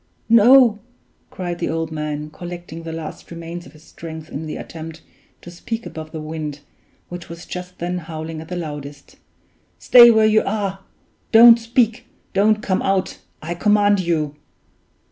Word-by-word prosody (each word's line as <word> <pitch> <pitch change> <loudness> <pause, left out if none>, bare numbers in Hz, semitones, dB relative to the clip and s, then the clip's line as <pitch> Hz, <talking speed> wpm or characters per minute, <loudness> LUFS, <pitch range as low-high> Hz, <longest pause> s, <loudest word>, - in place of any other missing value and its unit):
no!" 230 0 +6 0.5
cried 175 -2 -5
the 170 - -2
old 165 0 -3
man, 150 -1 -4
collecting 175 0 -8
the 165 0 -7
last 160 -1 -8
remains 170 0 -8
of 140 - -17
his 155 0 -18
strength 160 -1 -10
in 155 +3 -5
the 155 - -5
attempt 160 0 -9 0.4
to 175 - -10
speak 225 +6 -6
above 155 0 -8
the 160 - -6
wind, 155 -2 -6 0.5
which 175 -1 -8
was 170 0 -9
just 180 0 -8
then 180 +1 -3
howling 160 -1 -7
at 160 - -11
the 180 - -5
loudest; 145 -4 -8 0.6
"stay 240 -1 +8
where 220 -1 +4
you 215 0 +4
are 195 -2 -2 0.5
don't 230 +1 +8
speak, 230 0 0 0.3
don't 210 +2 +2
come 185 -2 0
out 195 -1 -1 0.2
I 170 +2 -3
command 205 +2 +3
you! 160 -5 -1
175 Hz, 160 wpm, -20 LUFS, 160-205 Hz, 0.6 s, stay